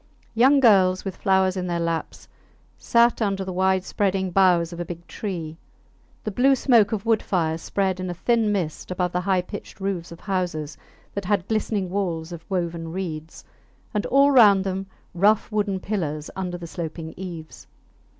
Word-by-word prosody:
Young 260 +5 +5
girls, 190 -7 +4
with 190 -2 -4
flowers 190 -1 +2
in 180 -1 -3
their 170 -1 -1
laps, 165 -1 -3 0.5
sat 235 0 +3
under 195 -2 0
the 185 - -4
wide 190 0 +2
spreading 190 -1 -1
boughs 175 -2 +3
of 170 - -8
a - - -1
big 170 0 -8
tree. 170 -7 -5 0.7
The 215 - -3
blue 265 +6 +4
smoke 235 -5 +4
of 220 -1 -3
wood 225 -1 +3
fires 165 -3 -1
spread 190 -2 -1
in 185 0 -3
a - - -2
thin 225 +3 +1
mist 175 -7 -3
above 180 -1 -1
the 180 - -1
high 185 -1 +1
pitched 205 +1 -9
roofs 190 -4 -3
of 170 - -10
houses 175 -6 -2 0.4
that 200 -1 -4
had 195 -1 0
glistening 210 -4 -1
walls 175 -4 -2
of 170 -1 -8
woven 170 -3 -2
reeds, 165 -3 -6 0.5
and 210 -1 -1
all 280 +1 +5
round 205 -7 +6
them 190 0 -3 0.3
rough 205 +6 +2
wooden 205 -2 0
pillars 155 -7 -3
under 180 -2 -3
the 175 - -8
sloping 165 -1 -6
eaves. 170 -4 -9
185 Hz, 175 wpm, -24 LUFS, 170-205 Hz, 0.7 s, round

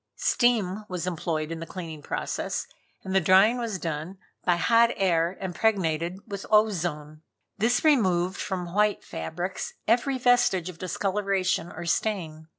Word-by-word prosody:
Steam 215 -5 +1
was 180 -2 -3
employed 160 -3 -2
in 165 - -4
the 165 - -7
cleaning 165 -4 -7
process, - - -3 0.4
and 190 - -4
the 190 - +4
drying 195 +8 +5
was 230 -5 -2
done 165 +2 -4 0.3
by 175 - +3
hot 230 +6 +4
air 175 -1 +1
impregnated 180 -3 0
with 200 -3 -6
ozone. 170 -8 +1 0.4
This 235 +4 +2
removed 185 - +2
from 180 -3 -4
white 210 0 +2
fabrics 175 - -5
every 245 +4 +2
vestige 245 -8 +3
of 170 -2 -11
discoloration 190 -1 -1
or 170 +2 -7
stain. 160 -4 -2
185 Hz, 140 wpm, -26 LUFS, 170-210 Hz, 0.4 s, drying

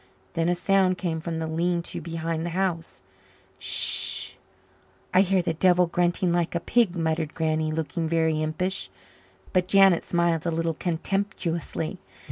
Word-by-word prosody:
Then 165 +1 0
a 175 - +2
sound 185 0 +2
came 165 -4 -2
from 165 0 -4
the 160 - -3
lean 170 +2 -1
to - - -5
behind 165 -1 -3
the 175 - -3
house. 170 - -3 0.6
"S - - -29
s - - +3
h. - - -27 0.8
I 185 - +6
hear 190 -1 +2
the 165 - -1
devil 180 +2 +4
grunting 175 +1 0
like 175 0 -1
a - - +1
pig," 215 0 +1
muttered 160 -2 -2
Granny, 155 -1 0
looking 160 +1 -3
very 160 -1 +1
impish. 180 +5 -1 0.6
But 180 -1 +2
Janet 195 -3 +5
smiled 170 -1 0
a - - +2
little 165 0 -1
contemptuously. 170 -1 -3
170 Hz, 160 wpm, -25 LUFS, 160-180 Hz, 0.8 s, I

